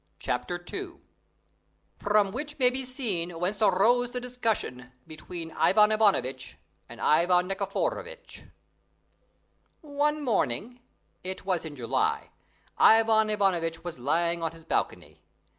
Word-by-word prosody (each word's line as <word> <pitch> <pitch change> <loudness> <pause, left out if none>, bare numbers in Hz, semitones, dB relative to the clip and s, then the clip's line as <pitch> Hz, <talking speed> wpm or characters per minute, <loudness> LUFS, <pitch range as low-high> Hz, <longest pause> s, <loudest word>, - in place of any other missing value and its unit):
CHAPTER 175 0 -3
II 380 -3 -5 1.1
FROM 205 -1 +2
WHICH 295 +6 -5
MAY 250 -3 +4
BE 260 +1 -3
SEEN 195 - -3
WHENCE 195 +5 -2
AROSE 225 +5 +3
THE 250 - -2
DISCUSSION 225 - -3
BETWEEN 165 +1 -8
IVAN 210 +5 +4
IVANOVITCH 135 - +1 0.3
AND 120 - -11
IVAN 180 +3 +3
NIKIFOROVITCH 200 - -4 1.4
One 295 0 -1
morning 230 - -1 0.4
it 185 +1 -6
was 180 -4 -1
in 155 -2 -7
July 120 -4 -1 0.5
Ivan 220 -1 +5
Ivanovitch 175 -6 0
was 175 -7 -6
lying 170 +6 0
on 165 0 -2
his 165 -1 -15
balcony. - - -3
195 Hz, 115 wpm, -27 LUFS, 165-245 Hz, 1.4 s, Ivan